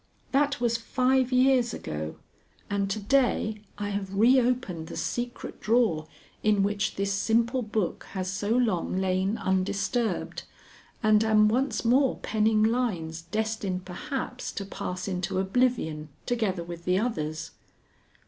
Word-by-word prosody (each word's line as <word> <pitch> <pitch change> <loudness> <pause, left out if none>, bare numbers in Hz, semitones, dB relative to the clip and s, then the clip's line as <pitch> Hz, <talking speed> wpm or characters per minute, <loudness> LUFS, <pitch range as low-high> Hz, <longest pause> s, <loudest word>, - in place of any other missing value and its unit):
That 285 0 +2
was 235 -1 +1
five 255 +2 +1
years 255 -2 +4
ago, 75 0 -5 0.6
and 200 -1 0
to 200 - -1
day 220 -1 +1 0.2
I 205 0 -3
have 195 -1 -3
reopened 240 -7 +3
the - - -7
secret 240 0 -4
drawer 215 -10 +2 0.3
in 210 -2 +3
which 205 +1 0
this 200 0 0
simple 230 +5 +2
book 210 -5 -2
has 185 -2 -2
so 190 +2 -2
long 225 -7 +1
lain 190 +3 +1
undisturbed, 195 +4 -1 0.6
and 215 0 +5
am 215 -1 +5
once 255 +3 0
more 260 +3 +4
penning 215 0 +2
lines 200 -9 0
destined 195 0 -2
perhaps 255 +6 -4
to 200 - -4
pass 185 -1 -5
into 185 -1 -2
oblivion 190 -7 0 0.2
together 210 -8 0
with 170 0 -8
the 180 +1 +2
others. 165 -7 -2
215 Hz, 130 wpm, -27 LUFS, 185-240 Hz, 0.6 s, and